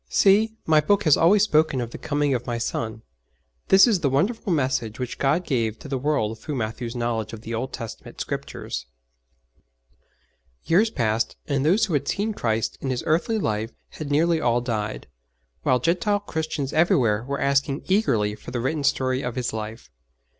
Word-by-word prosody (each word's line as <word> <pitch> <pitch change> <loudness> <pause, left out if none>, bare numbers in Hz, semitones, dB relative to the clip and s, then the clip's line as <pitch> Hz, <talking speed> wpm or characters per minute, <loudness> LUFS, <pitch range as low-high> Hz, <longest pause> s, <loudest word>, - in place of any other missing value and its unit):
'See, 215 +3 +4
My 155 -1 +5
Book 205 +6 +2
has 155 -4 +6
always 195 +5 +5
spoken 155 -8 +2
of 120 -1 -4
the - - -8
coming 145 -1 0
of 120 -1 -3
My 120 -1 -1
Son.' 115 -1 -3 0.6
This 190 +1 +7
is 220 -7 +2
the 145 -5 +1
wonderful 200 - 0
message 130 -7 0
which 125 -2 -4
God 155 +6 +1
gave 115 -5 0
to 150 - -11
the 135 -2 -2
world 125 -6 0
through 150 +6 -5
Matthew's 115 +1 -4
knowledge 115 -2 -2
of 110 - -7
the 115 +1 -6
Old 125 +4 -3
Testament 115 -3 -8
Scriptures. - - -5 1.8
Years 205 +7 +4
passed, 115 - 0
and 140 -1 0
those 195 +9 +4
who 185 - -4
had 140 -1 0
seen 215 +2 -1
Christ 110 - -1
in 135 - -3
His 130 -2 -2
earthly 175 +9 +1
life 110 - -2 0.2
had 155 -2 -7
nearly 160 +3 +2
all 120 0 +2
died, 110 -3 -3 0.6
while 130 - +3
Gentile 180 +7 +1
Christians 160 -6 -3
everywhere 120 -9 +3
were 140 +2 -3
asking 140 0 +1
eagerly 115 - +2
for 105 - -10
the 125 0 -3
written 140 +5 -1
story 130 -2 +1
of 125 -3 -4
His 125 -3 -2
life. 110 - -6
135 Hz, 180 wpm, -24 LUFS, 115-165 Hz, 1.8 s, This